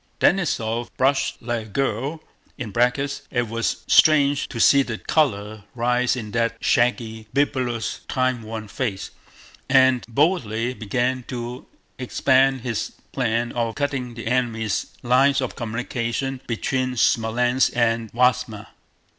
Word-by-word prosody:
Denísov 120 -11 +1
blushed 135 +1 +1
like 115 -2 -3
a - - -16
girl 135 +6 -2 0.3
(it 125 +1 -1
was 115 +1 -2
strange 145 -2 +4
to 115 - -6
see 140 +4 +6
the 115 -4 -3
color 110 -9 0
rise 125 +1 +1
in 110 -4 -6
that 115 0 0
shaggy, 115 -2 0
bibulous, 125 -5 0
time 130 -2 0
worn 110 0 -6
face) 100 -4 -4 0.6
and 130 -2 +5
boldly 120 - +1
began 125 +3 -1
to 120 0 -6 0.3
expound 130 +1 +2
his 115 -3 -3 0.2
plan 120 -2 0
of 115 -2 -2
cutting 135 -4 -2
the 115 - -7
enemy's 110 -3 -1 0.2
lines 135 +3 +4
of 130 -2 -3
communication 120 +2 -3
between 130 +2 -1
Smolénsk 120 +3 +2
and 115 -2 +1
Vyázma. 125 -3 +1
120 Hz, 120 wpm, -23 LUFS, 115-130 Hz, 0.6 s, see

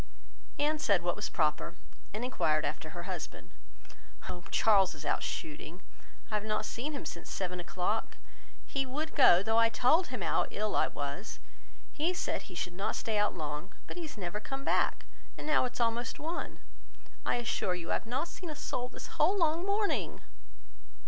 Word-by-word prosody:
Anne 300 +1 +2
said 200 - +3
what 175 - +1
was - - -2
proper, 155 +2 +1 0.4
and 220 +4 -2
enquired 155 -11 +2
after 150 +2 -3
her 175 +1 -6
husband. 180 -4 -5 0.8
"Oh! 175 - -5
Charles 195 -5 +5
is 150 0 -8
out - - +1
shooting. 160 +4 -5 0.5
I - - -4
have 210 -1 +1
not 215 0 0
seen 275 +9 -3
him 280 - -4
since 170 - -6
seven 180 -1 -2
o'clock. 180 +5 -1 0.5
He 275 - 0
would 295 +5 -3
go, 175 +2 +7
though 225 +2 +4
I 230 0 +6
told 255 +11 +4
him - - -5
how - - +2
ill 210 0 -1
I - - +4
was. 145 +9 -4 0.6
He 335 +4 +1
said - - -2
he 180 - -9
should 175 +1 -2
not 195 +3 -1
stay 220 -2 0
out 210 -2 +2
long; 150 +3 -4
but - - -7
he 355 - -4
has 300 - -11
never 185 +1 -3
come 270 +5 -5
back, - - +2 0.3
and - - -6
now 305 -3 +4
it 250 - -3
is - - -7
almost 235 0 +1
one. 330 +3 -4 0.6
I - - +2
assure 225 -6 0
you, 170 -2 -4
I - - +4
have - - -1
not 260 +8 0
seen 345 0 -7
a 305 - -4
soul 250 -4 -2
this - - -8 0.2
whole 365 +7 +5
long 335 +1 +2
morning." 410 +1 +1
215 Hz, 190 wpm, -32 LUFS, 175-285 Hz, 0.8 s, go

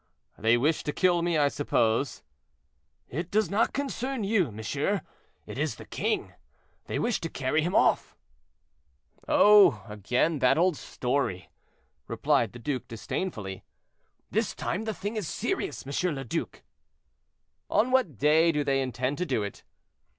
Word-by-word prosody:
"They 115 +2 +3
wish 150 +6 +1
to 150 - 0
kill 175 -2 +3
me, 170 -1 +1
I 145 -1 +4
suppose." 135 -3 0 0.8
"It 165 +6 -4
does 215 +1 +1
not 215 +3 +2
concern 270 -3 -3
you, 195 - +1
monsieur; 140 - -2 0.4
it - - -7
is - - -1
the - - -11
king. - - -2 0.5
They - - -2
wish 235 -2 0
to 165 - -3
carry 135 +3 0
him 175 +4 -1
off." - - +2 1.1
"Oh! 205 - +6
again 120 - 0
that 130 +2 +4
old 180 0 +3
story," 125 -10 -2 0.6
replied - - +1
the - - -8
duke, 130 +1 -3
disdainfully. 110 - -5 0.7
"This - - 0
time 205 +6 -3
the 220 - -2
thing 205 +3 -4
is 205 -6 -3
serious, 385 - -3
M. 150 +4 -1
le 135 - -5
Duc." 120 - -4 1.1
"On 225 +5 +2
what 235 - +2
day 155 +5 +4
do 150 -2 0
they 135 -1 +1
intend 130 +2 -2
to 180 - 0
do 120 -7 0
it?" 100 - -7
150 Hz, 150 wpm, -28 LUFS, 125-195 Hz, 1.1 s, Oh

